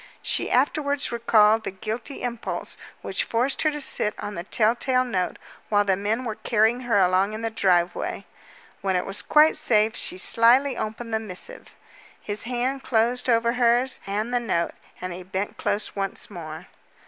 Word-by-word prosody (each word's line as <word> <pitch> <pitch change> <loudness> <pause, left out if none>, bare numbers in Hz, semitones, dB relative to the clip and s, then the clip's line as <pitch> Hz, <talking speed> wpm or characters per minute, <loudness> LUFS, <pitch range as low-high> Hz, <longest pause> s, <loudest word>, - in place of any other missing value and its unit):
She - - 0
afterwards 285 +2 +1
recalled 225 -2 +4
the - - -3
guilty 220 +8 -5
impulse 240 -2 -4 0.3
which - - 0
forced 245 +4 0
her 310 - +3
to 295 -1 -4
sit 210 -6 +1
on 205 0 -5
the 170 - -5
tell 220 +3 +2
tale 255 +1 +1
note 190 -8 -2 0.3
while 205 -1 +3
the 195 -1 +2
men 215 +6 -2
were 225 - -2
carrying 225 +2 +1
her 225 - +4
along 190 +2 +3
in 220 +1 -6
the 225 - -1
driveway. 180 -4 0 0.6
When 190 -2 0
it 180 - 0
was 195 +1 0
quite 305 +1 +5
safe 215 -1 +2
she - - -3
slyly 245 +7 +4
opened 225 +1 -5
the 220 - +2
missive. 220 - -6 0.4
His 205 +1 -4
hand 250 +3 -2
closed 245 +2 +1
over 235 0 +3
hers, 245 +1 +2
and 215 +5 -2
the 245 - +3
note, 185 -8 -1 0.3
and 185 -1 -5
he 180 - -7
bent 190 +2 -4
close 210 - -1
once 195 +1 -3
more. 160 -4 -8
220 Hz, 175 wpm, -24 LUFS, 200-245 Hz, 0.6 s, quite